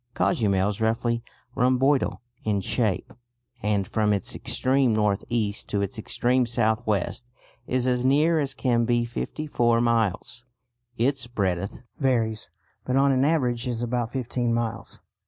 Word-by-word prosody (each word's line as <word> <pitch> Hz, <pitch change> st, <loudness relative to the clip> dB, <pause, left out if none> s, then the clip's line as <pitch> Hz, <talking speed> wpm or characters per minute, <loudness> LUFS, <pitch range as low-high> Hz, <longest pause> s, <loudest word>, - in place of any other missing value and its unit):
Cozumel 100 Hz, -4 st, +2 dB
is 105 Hz, +1 st, -5 dB
roughly 115 Hz, +1 st, +1 dB, 0.3 s
rhomboidal 130 Hz, +2 st, +2 dB, 0.2 s
in 105 Hz, -2 st, +1 dB
shape, 105 Hz, 0 st, -1 dB, 0.5 s
and 105 Hz, -2 st, 0 dB
from 105 Hz, -2 st, +1 dB
its 100 Hz, -, -2 dB
extreme 130 Hz, -3 st, +1 dB
north 105 Hz, -2 st, +1 dB
east 105 Hz, -4 st, -1 dB
to 100 Hz, -1 st, 0 dB
its 100 Hz, +4 st, -4 dB
extreme 125 Hz, +3 st, +1 dB
south 110 Hz, -1 st, +1 dB
west 110 Hz, +3 st, -1 dB, 0.4 s
is 125 Hz, -1 st, 0 dB
as 125 Hz, -1 st, +1 dB
near 150 Hz, +5 st, +4 dB
as 140 Hz, -2 st, -1 dB
can 120 Hz, -4 st, +1 dB
be 120 Hz, 0 st, +2 dB
fifty 125 Hz, +6 st, -4 dB
four 120 Hz, -5 st, +2 dB
miles. 115 Hz, 0 st, 0 dB, 0.5 s
Its 130 Hz, +1 st, +1 dB
breadth 100 Hz, -4 st, -2 dB, 0.2 s
varies, 115 Hz, -, 0 dB, 0.3 s
but 125 Hz, -, -1 dB
on 140 Hz, +1 st, +4 dB
an 130 Hz, 0 st, +2 dB
average 130 Hz, -5 st, +1 dB
is 120 Hz, -1 st, -2 dB
about 120 Hz, -1 st, -1 dB
fifteen 125 Hz, -2 st, -1 dB
miles. 115 Hz, -1 st, -3 dB
120 Hz, 145 wpm, -25 LUFS, 110-130 Hz, 0.5 s, near